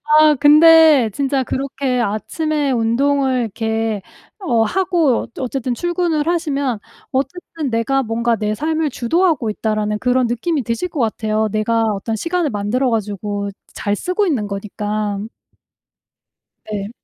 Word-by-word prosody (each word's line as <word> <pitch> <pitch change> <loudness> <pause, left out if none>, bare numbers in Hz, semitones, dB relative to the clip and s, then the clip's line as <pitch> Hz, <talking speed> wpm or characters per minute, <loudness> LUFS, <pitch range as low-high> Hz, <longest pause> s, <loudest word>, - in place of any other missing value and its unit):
아 305 0 +5
근데 305 -3 +7
진짜 275 -1 0
그렇게 265 -1 -2
아침에 285 +7 -1
운동을 260 +3 +1
이렇게 220 -1 -2 0.4
어 245 - +1
하고 345 - +1
어쨌든 255 -1 -2
출근을 345 -1 -1
하시면 285 - 0 0.3
어쨌든 305 +1 -3
'내가 235 +4 +1
뭔가 230 0 0
내 210 0 -1
삶을 310 +4 -1
주도하고 290 0 +1
있다.'라는 210 0 -1
그런 250 +1 +2
느낌이 260 +5 -1
드실 235 +11 -2
것 315 - -5
같아요. 220 -1 0
내가 225 +2 +1
어떤 210 +3 -3
시간을 335 - -1
만들어 220 +5 0
가지고 205 -2 -2 0.2
잘 205 0 -2
쓰고 365 - 0
있는 255 - 0
거니까. 205 0 -3 1.5
네. 200 -1 -3
250 Hz, 280 characters per minute, -18 LUFS, 220-305 Hz, 1.5 s, 근데